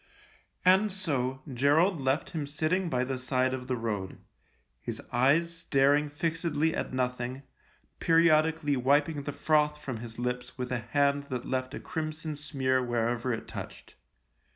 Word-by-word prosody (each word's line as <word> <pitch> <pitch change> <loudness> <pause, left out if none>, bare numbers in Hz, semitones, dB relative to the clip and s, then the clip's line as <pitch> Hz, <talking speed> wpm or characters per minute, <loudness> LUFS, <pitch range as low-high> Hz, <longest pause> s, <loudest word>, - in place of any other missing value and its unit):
And 190 +3 +5
so 135 -9 -2
Gerald 150 +7 +3
left 135 +3 0
him 155 -3 -3
sitting 160 +5 0
by 125 -3 +1
the 130 0 -3
side 130 0 +1
of 125 -1 -5
the 130 - 0
road, 105 -5 -3 0.6
his - - -5
eyes 160 +7 +3
staring 145 -2 +2
fixedly 160 0 0
at - - -3
nothing, 125 +1 -2 0.6
periodically 160 -2 +3
wiping 145 +4 +2
the 145 - -4
froth 150 0 +2
from 130 -5 -5
his 115 0 -8
lips 125 +1 -3
with 125 -1 -4
a 125 - 0
hand 140 +4 +1
that 125 -3 -4
left 130 +1 -2
a - - -5
crimson 155 -1 -4
smear 135 -3 0
wherever 120 +1 0
it 115 - -4
touched. - - -8
140 Hz, 150 wpm, -29 LUFS, 125-155 Hz, 0.6 s, And